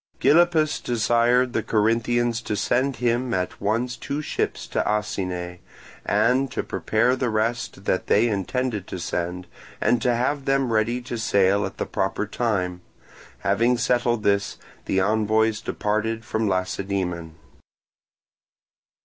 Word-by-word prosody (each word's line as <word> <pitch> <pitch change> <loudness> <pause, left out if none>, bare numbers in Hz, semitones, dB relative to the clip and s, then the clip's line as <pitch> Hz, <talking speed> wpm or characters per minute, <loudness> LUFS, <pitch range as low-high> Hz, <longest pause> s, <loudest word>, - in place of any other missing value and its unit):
Gylippus 155 +1 +4
desired 120 +2 +2
the - - +1
Corinthians 115 +2 +1
to 105 - -3
send 130 +6 +1
him 120 0 0
at 90 -1 -3
once 115 +5 0
two 140 +5 -4
ships - - -2
to - - 0
Asine, 90 -4 -2 0.4
and 130 +3 +2
to - - -2
prepare 115 +4 +1
the 125 -2 -1
rest 110 -2 -2
that 95 - 0
they 110 +4 +4
intended 105 +1 -2
to - - -5
send, 90 +1 -3 0.3
and 120 - +2
to 125 - +2
have 135 +3 -1
them 135 -3 +1
ready 115 +3 +1
to 120 -1 -5
sail 100 -2 +2
at - - -11
the - - -2
proper 95 +1 -1
time. 100 -6 -1 0.6
Having 115 +5 +2
settled 120 -2 +1
this, 100 0 +1 0.3
the 95 - +1
envoys 110 +2 +2
departed 110 +2 -2
from 110 -1 -1
Lacedaemon. 95 -3 -2
110 Hz, 130 wpm, -24 LUFS, 100-120 Hz, 0.6 s, Gylippus